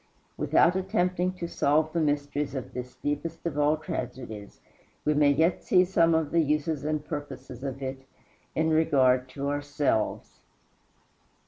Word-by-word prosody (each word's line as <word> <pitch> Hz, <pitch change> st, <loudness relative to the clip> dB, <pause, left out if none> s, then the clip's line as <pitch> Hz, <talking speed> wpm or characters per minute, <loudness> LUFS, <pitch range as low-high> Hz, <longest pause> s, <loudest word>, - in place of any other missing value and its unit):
Without 175 Hz, -, +3 dB
attempting 185 Hz, -2 st, 0 dB
to 175 Hz, -2 st, -5 dB
solve 155 Hz, 0 st, +1 dB
the 170 Hz, -, +1 dB
mysteries 145 Hz, -1 st, -1 dB
of 130 Hz, -, -5 dB
this 125 Hz, 0 st, -6 dB
deepest 150 Hz, +3 st, -4 dB
of 150 Hz, -3 st, -2 dB
all 150 Hz, +1 st, +3 dB
tragedies, 115 Hz, -8 st, -6 dB, 0.5 s
we 150 Hz, -, +3 dB
may 145 Hz, -1 st, +4 dB
yet 160 Hz, +5 st, +2 dB
see 185 Hz, -1 st, +4 dB
some 170 Hz, -3 st, +3 dB
of 160 Hz, -2 st, 0 dB
the 170 Hz, -, +3 dB
uses 150 Hz, -1 st, 0 dB
and 155 Hz, 0 st, -2 dB
purposes 140 Hz, -4 st, -7 dB
of 135 Hz, 0 st, -4 dB
it 130 Hz, 0 st, -4 dB, 0.5 s
in 160 Hz, +1 st, +2 dB
regard 130 Hz, -5 st, +3 dB
to 140 Hz, +2 st, -4 dB
ourselves. 145 Hz, -5 st, -1 dB
150 Hz, 145 wpm, -27 LUFS, 140-160 Hz, 0.5 s, may